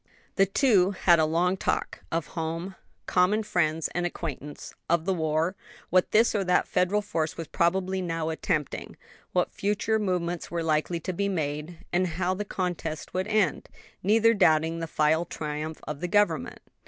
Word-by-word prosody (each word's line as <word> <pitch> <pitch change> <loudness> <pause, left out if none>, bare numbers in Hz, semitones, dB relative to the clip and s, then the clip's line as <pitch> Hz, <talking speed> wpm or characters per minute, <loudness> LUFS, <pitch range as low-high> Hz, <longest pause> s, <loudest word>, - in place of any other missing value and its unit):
The 195 -1 +4
two 195 -3 +4
had 170 -2 +5
a 160 - +4
long 180 +4 +1
talk: - - -1
of 165 -1 -2
home, 165 +3 -3 0.3
common 195 +4 +2
friends 165 -6 0
and 175 - -2
acquaintance; 150 -4 -5 0.2
of 170 -1 +2
the 190 - +2
war, 160 +2 0 0.4
what 185 0 +4
this 225 +2 +4
or 205 -2 +1
that 180 -1 +2
Federal 200 +3 +1
force 165 -6 -2
was 165 - -5
probably 185 +3 +1
now 165 -2 -2
attempting; 160 -2 -2 0.3
what - - +1
future 210 +2 0
movements 175 -4 -2
were 170 -1 -2
likely 160 +2 0
to 185 - -3
be 200 +3 -1
made, 160 +1 -3
and 180 +1 +2
how 185 0 +1
the 200 +2 -3
contest 175 -5 -4
would 185 +1 -1
end; 215 -3 +1 0.3
neither 225 +4 +4
doubting 165 -4 +3
the 165 - -3
final 155 +1 +2
triumph 155 -1 -5
of 150 -2 -4
the 180 - -2
government. 205 +2 +1
175 Hz, 165 wpm, -27 LUFS, 160-190 Hz, 0.4 s, had